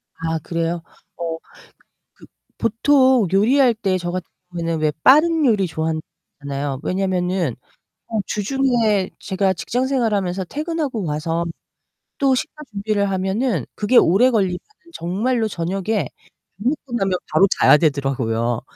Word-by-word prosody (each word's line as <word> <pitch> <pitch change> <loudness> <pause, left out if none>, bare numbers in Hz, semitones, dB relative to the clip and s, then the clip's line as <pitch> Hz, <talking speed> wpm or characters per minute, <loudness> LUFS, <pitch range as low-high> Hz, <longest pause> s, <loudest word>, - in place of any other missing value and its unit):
아 165 0 -2
그래요? 165 +1 -2 0.4
어 165 -1 -3 0.8
그 - - -17 0.3
보통 255 +1 +3
요리할 240 +5 +4
때 195 -4 0
저 175 -1 -4
같은 180 -1 -4 0.2
경우에는 165 -2 -2
왜 155 -1 +1
빠른 315 +3 +5
요리 210 -5 +3
좋아한다 160 -1 -2 0.4
했잖아요. 140 -1 -3
왜냐면은 180 -6 -1 0.5
어 220 - -2
주중에 220 -3 +1
제가 190 -1 0
직장 250 +9 -2
생활하면서 205 -8 0
퇴근하고 295 - -3
와서 165 +2 -2 0.7
또 270 -2 +3
식사 305 +4 -4
준비를 200 0 0
하면은 190 - 0
그게 215 +4 +1
오래 215 +9 +6
걸리면은 190 -6 +1 0.4
정말로 220 - -1
저녁에 195 +4 -2 0.5
밥 205 - -7
먹고 275 -3 -4
나면 190 -4 0
바로 195 - +5
자야 - - +7
되더라고요. 130 -6 0
195 Hz, 295 characters per minute, -21 LUFS, 165-235 Hz, 0.8 s, 자야